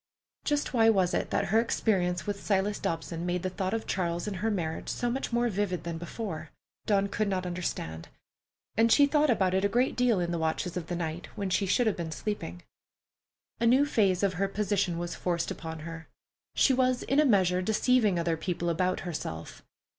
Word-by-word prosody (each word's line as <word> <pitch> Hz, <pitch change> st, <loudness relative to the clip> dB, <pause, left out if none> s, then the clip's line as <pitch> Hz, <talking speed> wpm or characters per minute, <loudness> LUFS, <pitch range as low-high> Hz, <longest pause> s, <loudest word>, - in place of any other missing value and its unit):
Just 290 Hz, -2 st, 0 dB
why 230 Hz, -3 st, +4 dB
it 225 Hz, -, +5 dB
was 185 Hz, -2 st, +2 dB
that -, -, -1 dB
her 200 Hz, +3 st, +2 dB
experience 180 Hz, -7 st, 0 dB
with 205 Hz, -1 st, -3 dB
Silas 200 Hz, 0 st, +1 dB
Dobson 165 Hz, 0 st, -3 dB
made 180 Hz, 0 st, -1 dB
the 185 Hz, -, -1 dB
thought 190 Hz, +3 st, -2 dB
of 225 Hz, -, -3 dB
Charles 175 Hz, -2 st, -1 dB
and 200 Hz, -2 st, -3 dB
her 220 Hz, +5 st, 0 dB
marriage 165 Hz, -6 st, -3 dB
so 240 Hz, -1 st, -1 dB
much 265 Hz, +1 st, -3 dB
more 240 Hz, +1 st, +2 dB
vivid 200 Hz, -4 st, -1 dB
than 170 Hz, -1 st, -4 dB
before, 175 Hz, 0 st, -5 dB, 0.4 s
Dawn 200 Hz, -1 st, +3 dB
could 210 Hz, +1 st, -1 dB
not 185 Hz, -2 st, -1 dB
understand, 175 Hz, -, -4 dB, 0.7 s
and 225 Hz, +1 st, +4 dB
she 285 Hz, -, +7 dB
thought 295 Hz, +1 st, +2 dB
about 190 Hz, -6 st, +2 dB
it 190 Hz, +1 st, +2 dB
a 200 Hz, -, +3 dB
great 245 Hz, +5 st, +1 dB
deal 245 Hz, -5 st, +3 dB
in 175 Hz, -1 st, -1 dB
the 170 Hz, -, -1 dB
watches 160 Hz, +2 st, -1 dB
of 175 Hz, -3 st, -4 dB
the 175 Hz, -, -2 dB
night, 165 Hz, 0 st, -4 dB
when 195 Hz, -2 st, -2 dB
she 195 Hz, +1 st, +1 dB
should 245 Hz, +6 st, +3 dB
have 220 Hz, -, +1 dB
been 165 Hz, -2 st, -4 dB
sleeping. 125 Hz, -, -4 dB, 1.0 s
A 235 Hz, -, +2 dB
new 260 Hz, +5 st, +5 dB
phase 200 Hz, -9 st, +2 dB
of 195 Hz, -2 st, +2 dB
her 195 Hz, +2 st, 0 dB
position 195 Hz, -3 st, 0 dB
was 175 Hz, 0 st, -3 dB
forced 170 Hz, -2 st, -1 dB
upon 160 Hz, -1 st, -6 dB
her: 165 Hz, 0 st, -8 dB, 0.5 s
she 270 Hz, -, +4 dB
was 255 Hz, -1 st, +2 dB
in 275 Hz, -, +2 dB
a -, -, +6 dB
measure 185 Hz, -8 st, +3 dB
deceiving 220 Hz, 0 st, +2 dB
other 170 Hz, -1 st, 0 dB
people 170 Hz, 0 st, -2 dB
about 180 Hz, +2 st, 0 dB
herself. 85 Hz, -, -6 dB
190 Hz, 205 wpm, -29 LUFS, 170-220 Hz, 1.0 s, she